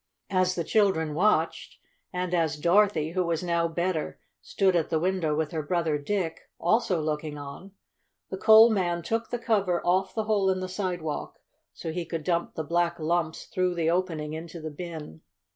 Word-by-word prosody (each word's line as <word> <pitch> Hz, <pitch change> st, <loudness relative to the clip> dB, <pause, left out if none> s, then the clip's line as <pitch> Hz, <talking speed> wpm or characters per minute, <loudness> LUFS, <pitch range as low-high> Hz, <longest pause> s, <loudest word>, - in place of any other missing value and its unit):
As 185 Hz, -1 st, +2 dB
the 170 Hz, -, -1 dB
children 175 Hz, -7 st, +2 dB
watched, 200 Hz, +7 st, +1 dB, 0.3 s
and 180 Hz, -1 st, -3 dB
as 165 Hz, -3 st, +1 dB
Dorothy, 170 Hz, -1 st, +3 dB
who 185 Hz, +1 st, 0 dB
was 170 Hz, -1 st, -1 dB
now 170 Hz, -1 st, +1 dB
better, 170 Hz, 0 st, -2 dB, 0.2 s
stood 190 Hz, -2 st, +1 dB
at 165 Hz, -2 st, +1 dB
the 160 Hz, -, +1 dB
window 175 Hz, -3 st, 0 dB
with 155 Hz, 0 st, -1 dB
her 160 Hz, -, -2 dB
brother 160 Hz, -1 st, 0 dB
Dick, 165 Hz, +1 st, -3 dB
also 185 Hz, -1 st, +2 dB
looking 150 Hz, -1 st, -3 dB
on, 145 Hz, +7 st, -9 dB, 0.6 s
the 190 Hz, -, -3 dB
coal 220 Hz, +2 st, +8 dB
man 175 Hz, -4 st, 0 dB
took 225 Hz, +5 st, -2 dB
the 245 Hz, -, -2 dB
cover 200 Hz, -7 st, +1 dB
off 185 Hz, +2 st, +1 dB
the 220 Hz, -, 0 dB
hole 210 Hz, -3 st, +2 dB
in 185 Hz, 0 st, +1 dB
the 185 Hz, -, -3 dB
sidewalk, 180 Hz, -5 st, -4 dB, 0.3 s
so 165 Hz, -, -6 dB
he 175 Hz, +2 st, -3 dB
could 165 Hz, -2 st, -4 dB
dump 170 Hz, +1 st, -1 dB
the 160 Hz, -, -2 dB
black 170 Hz, +2 st, 0 dB
lumps 160 Hz, 0 st, -1 dB
through 185 Hz, -1 st, -1 dB
the 165 Hz, -1 st, +1 dB
opening 165 Hz, -4 st, -1 dB
into 165 Hz, +1 st, -7 dB
the 155 Hz, 0 st, -6 dB
bin. 155 Hz, -, -8 dB
175 Hz, 180 wpm, -27 LUFS, 160-185 Hz, 0.6 s, coal